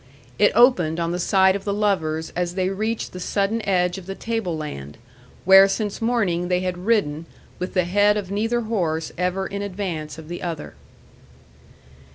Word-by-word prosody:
It - - +5
opened 180 -10 +4
on 170 0 -1
the 175 - -2
sight 190 +1 +3
of 200 - -4
the 200 0 -2
lovers 160 -7 -1
as 175 0 -2
they 185 -1 0
reached 215 +4 -3
the 180 - -7
sudden 200 +4 -1
edge 180 0 +1
of 185 - -14
the 195 - -5
tableland, 160 - -4 0.5
where 190 +1 +8
since 205 +1 -3
morning 205 -7 0
they 180 0 +1
had 185 -1 -2
ridden 165 -8 +1 0.3
with 180 - -5
the 180 - +3
head 205 +3 +3
of 195 -2 -5
neither 225 +4 0
horse 170 -8 -2
ever 180 +2 -1
in 200 +1 -5
advance 180 -7 -4
of 160 -1 -10
the 175 +1 -6
other. 165 -4 -5
185 Hz, 175 wpm, -22 LUFS, 170-205 Hz, 0.5 s, where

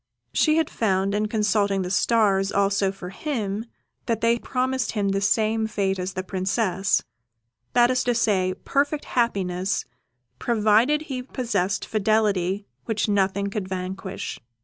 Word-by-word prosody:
She 310 0 +3
had 325 -2 +2
found, 195 -2 0
in 210 +1 +1
consulting 205 -2 +1
the 180 - -4
stars 200 -2 +2
also 200 -1 +2
for 190 -2 -8
him, 215 -3 -3 0.4
that 230 -3 0
they 230 +1 +2
promised 260 0 -1
him 205 -3 0
the 195 0 0
same 220 +2 +2
fate 195 -3 -1
as 185 +1 -3
the 185 - -3
Princess 190 0 0 0.7
that 240 0 +5
is 255 0 +1
to 245 -1 +2
say, 190 -5 +1
perfect 285 +2 0
happiness, 195 -5 0 0.5
provided 235 +6 +3
he 265 -4 -4
possessed 210 -7 -1
fidelity 205 -3 +1 0.2
which 220 -1 0
nothing 200 0 +1
could 200 -3 -3
vanquish. 190 +1 -5
205 Hz, 140 wpm, -24 LUFS, 195-230 Hz, 0.7 s, that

